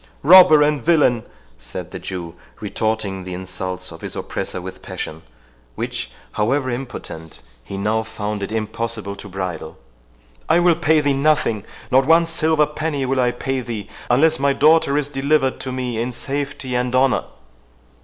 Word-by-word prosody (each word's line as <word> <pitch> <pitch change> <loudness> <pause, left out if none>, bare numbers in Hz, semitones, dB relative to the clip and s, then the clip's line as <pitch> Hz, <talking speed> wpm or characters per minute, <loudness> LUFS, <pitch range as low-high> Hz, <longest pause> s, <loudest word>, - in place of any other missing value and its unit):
"Robber 155 -2 +8
and 150 -4 +1
villain!" 145 -9 +3 0.3
said - - -7
the - - -6
Jew, 85 -3 -6 0.3
retorting 105 -2 -2
the 90 0 -6
insults 95 0 -5
of 80 - -11
his - - -5
oppressor - - -4
with 95 +1 -8
passion, 80 +1 -6 0.5
which, - - -4 0.2
however 130 +5 0
impotent, 100 - -7 0.2
he 95 - -7
now 110 +3 +1
found 105 -1 -4
it 100 - -4
impossible 110 -2 -3
to 100 +1 -10
bridle, 90 -4 -5 0.7
"I - - +5
will 175 0 +5
pay 160 -1 +3
thee 145 -1 +2
nothing—not 135 -2 +1
one 165 +1 +6
silver 160 -2 +2
penny 150 -2 -2
will 130 0 0
I 125 -1 +3
pay 135 +2 -2
thee, 115 -4 -6 0.2
unless 155 +6 +4
my 140 0 +3
daughter 150 -1 +4
is 145 -2 0
delivered 140 -1 +1
to 130 - -5
me 125 -3 -2
in 120 +2 -2
safety 140 0 -4
and 125 0 0
honour!" 130 0 +3
125 Hz, 155 wpm, -20 LUFS, 100-145 Hz, 0.7 s, Robber